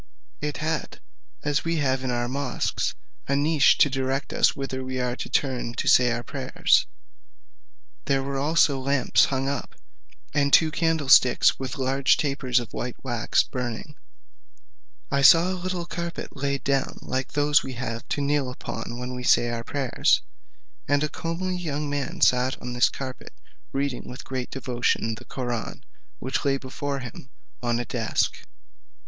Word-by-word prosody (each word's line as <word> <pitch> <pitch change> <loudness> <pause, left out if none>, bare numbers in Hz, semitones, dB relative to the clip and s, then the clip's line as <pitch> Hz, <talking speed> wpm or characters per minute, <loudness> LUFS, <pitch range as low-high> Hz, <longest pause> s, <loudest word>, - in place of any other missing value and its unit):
It 150 0 -2
had, 155 +1 -3 0.4
as 145 0 0
we 165 0 0
have 135 -3 0
in 130 - -2
our 120 0 -1
mosques, 135 0 -2 0.3
a 140 - +1
niche, 145 0 +4
to - - +6
direct 135 +1 -2
us - - +3
whither 130 -1 -4
we 130 0 -4
are 125 -1 -1
to - - -5
turn 125 -4 -1
to - - -3
say 125 -1 +6
our 120 0 -2
prayers: 130 -1 +1 1.2
there 135 -1 +1
were 135 0 -3
also 145 -1 +3
lamps 135 0 +3
hung 135 0 -1
up, 140 -2 -4 0.6
and 140 -1 +2
two 160 +1 +6
candlesticks 150 -6 +4
with 130 0 -4
large 135 +1 +2
tapers 135 -4 +1
of 120 - -8
white 125 0 -4
wax 120 -4 +1
burning. 125 +4 -5 1.2
I 140 - +2
saw 165 +6 +7
a - - -1
little 180 -1 -3
carpet 170 0 -5
laid 140 -1 -2
down 135 -1 0
like 130 0 -3
those 145 +1 +4
we 130 - -6
have 115 -2 -5
to 145 - -1
kneel 140 -2 +1
upon 120 -1 -6
when 125 +1 -5
we 125 - -5
say 120 -1 +3
our 115 -1 -3
prayers, 135 0 +1 0.6
and 145 +1 +2
a 150 - 0
comely 180 +5 -3
young 150 -4 -3
man 145 -1 -3
sat 125 +1 +3
on 125 0 -6
this 125 0 +4
carpet 130 -2 -7 0.4
reading 135 -2 -2
with 125 - -8
great 130 -2 -4
devotion 125 -3 -1
the 110 - -10
Koraun, 120 -4 -4 0.3
which 130 +1 -2
lay 140 -2 +2
before 140 +1 -4
him 125 +1 -9 0.3
on 120 -1 0
a 120 - -3
desk. 115 -3 0
135 Hz, 165 wpm, -25 LUFS, 125-145 Hz, 1.2 s, saw